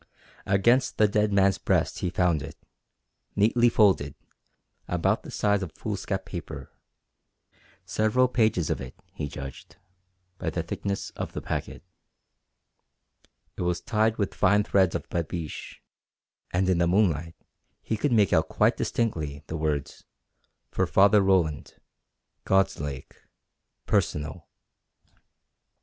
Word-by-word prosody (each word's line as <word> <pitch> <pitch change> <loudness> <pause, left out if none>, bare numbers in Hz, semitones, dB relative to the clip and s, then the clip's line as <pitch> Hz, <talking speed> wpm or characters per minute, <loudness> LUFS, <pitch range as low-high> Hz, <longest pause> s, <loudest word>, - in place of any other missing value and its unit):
Against 120 +7 +3
the 105 - +5
dead 105 0 +1
man's 100 -1 +3
breast - - 0
he 90 - -1
found 85 -4 +1
it, 70 - -8 0.8
neatly 120 +4 +4
folded, 95 -11 +3 0.7
about 90 -2 +1
the - - -11
size 105 -1 +1
of 90 -5 -5
foolscap 100 -2 -4
paper 80 -7 -7 1.1
several 110 +6 +2
pages 110 -9 +1
of - - -2
it, 65 -1 -8 0.2
he 75 - -4
judged, 70 -2 -9 0.6
by 90 - -2
the 85 +1 -3
thickness 100 +4 -4
of - - -6
the - - -4
packet. - - -4 1.7
It - - -6
was 90 -1 0
tied 110 0 +1
with 100 -3 -1
fine 105 +3 +3
threads 95 -4 +2
of - - -4
babiche, 85 -2 -5 0.7
and 95 +1 +1
in 90 -2 +2
the 85 - +3
moonlight 85 -4 +1 0.5
he 110 - -1
could 125 +6 0
make 105 -5 +3
out - - +3
quite - - +2
distinctly 80 -11 -2
the 80 - -6
words, 75 -3 -2 0.7
"For - - 0
Father 100 +1 +5
Roland, 90 -6 +1 0.7
God's 95 0 +2
Lake 70 -2 -6 0.7
Personal." 75 +2 -1
95 Hz, 125 wpm, -26 LUFS, 80-105 Hz, 1.7 s, the